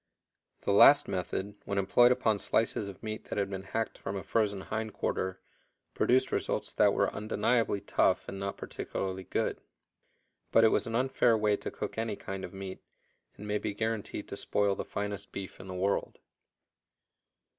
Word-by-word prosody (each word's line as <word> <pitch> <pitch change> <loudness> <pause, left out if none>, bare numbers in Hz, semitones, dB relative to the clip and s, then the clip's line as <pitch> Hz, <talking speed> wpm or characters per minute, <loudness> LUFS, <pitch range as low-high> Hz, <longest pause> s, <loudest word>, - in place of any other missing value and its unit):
The 100 - +1
last 140 +8 +8
method, 95 +2 -3
when 100 - -2
employed 120 +6 +5
upon 110 -5 +2
slices 110 -2 0
of 95 - -12
meat 110 0 -5
that - - -5
had 100 -1 0
been 95 -1 -4
hacked 110 +3 -3
from 95 - -4
a 95 - -4
frozen 105 -3 0
hind 110 +1 -4
quarter, 95 0 -2 0.5
produced 130 +1 +3
results - - -1
that - - +4
were - - +1
undeniably 105 0 +1
tough - - +2
and 95 - -6
not 100 0 -3
particularly 95 -1 -4
good. - - -1 0.9
But 115 - +6
it 110 - +7
was - - +2
an 115 - -3
unfair 125 -2 +3
way 105 -1 +2
to - - -5
cook - - -5
any 110 -2 -1
kind 95 -1 -6
of - - -6
meat, 95 -1 -7 0.6
and 105 - -8
may 105 0 0
be 100 - -3
guarantied 110 -1 -3
to - - -5
spoil 100 -1 +1
the - - -4
finest 100 0 -4
beef 95 -1 -7
in - - -10
the 95 - -6
world. 95 +2 0
105 Hz, 175 wpm, -30 LUFS, 95-110 Hz, 0.9 s, last